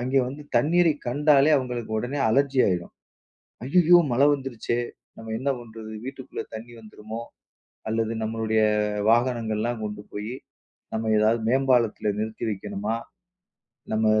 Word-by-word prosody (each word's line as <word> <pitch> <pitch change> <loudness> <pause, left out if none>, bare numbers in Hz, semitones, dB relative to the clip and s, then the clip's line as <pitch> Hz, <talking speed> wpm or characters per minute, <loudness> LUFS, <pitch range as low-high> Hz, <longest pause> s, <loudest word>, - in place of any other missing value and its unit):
அங்கே 130 +2 +1
வந்து 140 +3 -7
தண்ணீரைக் 165 -1 +3
கண்டாலே 145 +3 +4
அவங்களுக்கு 125 -4 -3
உடனே 130 +5 -3
அலர்ஜி 135 +3 +2
ஆயிடும். 90 -3 -1 0.7
"ஐயயோ! 175 +4 +6
மழை 135 +4 +5
வந்துருச்சே. 125 -4 -2 0.4
நம்ம 110 0 -7
என்ன 135 +3 0
பண்றது? 110 -2 -10
வீட்டுக்குள்ள 135 -1 -6
தண்ணி 115 +2 -8
வந்துருமோ? 110 +1 -8 0.7
அல்லது 115 0 0
நம்மளுடைய 110 0 0 0.5
வாகனங்கள்லாம் 115 -1 +1
கொண்டு 105 0 -5
போய் 105 +3 -5 0.6
நம்ம 110 0 -1
எதாவது 110 +2 +3
மேம்பாலத்தில 125 -5 +2
நிறுத்தி 110 +1 -3
வைக்கணுமா? 105 +2 -3 1.0
நம்ம 110 0 +2
115 Hz, 120 wpm, -25 LUFS, 110-135 Hz, 1.0 s, ஐயயோ